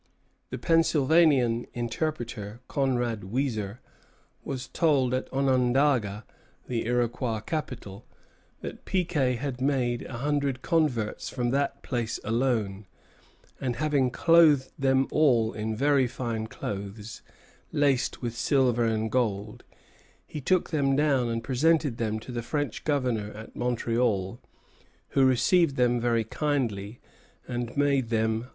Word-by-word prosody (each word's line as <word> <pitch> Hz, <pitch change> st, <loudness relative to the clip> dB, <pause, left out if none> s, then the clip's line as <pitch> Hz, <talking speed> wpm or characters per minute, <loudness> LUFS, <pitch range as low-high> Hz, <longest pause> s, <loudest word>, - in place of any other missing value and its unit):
The -, -, -4 dB
Pennsylvanian 150 Hz, -6 st, +3 dB
interpreter, 120 Hz, -3 st, -3 dB
Conrad 125 Hz, -5 st, 0 dB
Weiser, 110 Hz, -2 st, -2 dB, 0.7 s
was 130 Hz, -2 st, -5 dB
told 135 Hz, -3 st, +2 dB
at 130 Hz, -, -2 dB
Onondaga, 130 Hz, -5 st, +2 dB, 0.4 s
the 115 Hz, -2 st, -2 dB
Iroquois 120 Hz, -2 st, 0 dB
capital, 120 Hz, -7 st, -5 dB, 0.5 s
that -, -, -7 dB
Piquet 160 Hz, -9 st, 0 dB
had 130 Hz, 0 st, -4 dB
made 125 Hz, -3 st, +1 dB
a -, -, -9 dB
hundred 140 Hz, -1 st, -1 dB
converts 130 Hz, -10 st, 0 dB
from 120 Hz, -2 st, -1 dB
that 140 Hz, +1 st, -1 dB
place 120 Hz, -3 st, -2 dB
alone; 110 Hz, -4 st, -1 dB, 0.7 s
and 125 Hz, -3 st, -2 dB
that, -, -, -10 dB
"having 145 Hz, -4 st, +2 dB
clothed 155 Hz, -1 st, +4 dB
them 135 Hz, 0 st, +2 dB
all 120 Hz, -7 st, +3 dB
in 110 Hz, +1 st, -3 dB
very 140 Hz, +1 st, +3 dB
fine 115 Hz, -3 st, -4 dB
clothes, 100 Hz, +1 st, -6 dB, 0.5 s
laced 140 Hz, -3 st, +1 dB
with 120 Hz, -1 st, -3 dB
silver 125 Hz, -2 st, +2 dB
and 110 Hz, -1 st, 0 dB
gold, 105 Hz, -4 st, -1 dB, 0.6 s
he 150 Hz, -, -7 dB
took 185 Hz, +6 st, +1 dB
them 140 Hz, -4 st, +2 dB
down 135 Hz, -4 st, +2 dB
and 115 Hz, 0 st, -2 dB
presented 145 Hz, 0 st, +2 dB
them 110 Hz, -2 st, -1 dB
to 125 Hz, -, -9 dB
the 120 Hz, -1 st, -3 dB
French 145 Hz, +1 st, -3 dB
Governor 125 Hz, -8 st, 0 dB
at 110 Hz, +1 st, -11 dB
Montreal, 115 Hz, -4 st, 0 dB, 0.7 s
who 135 Hz, -, +3 dB
received 135 Hz, +5 st, +3 dB
them 125 Hz, -1 st, +2 dB
very 115 Hz, -1 st, +2 dB
kindly, 115 Hz, -5 st, -2 dB, 0.5 s
and 120 Hz, 0 st, -4 dB
made 140 Hz, -4 st, +2 dB
them 110 Hz, -1 st, +1 dB
large 110 Hz, -, -1 dB
presents." -, -, -18 dB
125 Hz, 130 wpm, -27 LUFS, 115-140 Hz, 0.7 s, clothed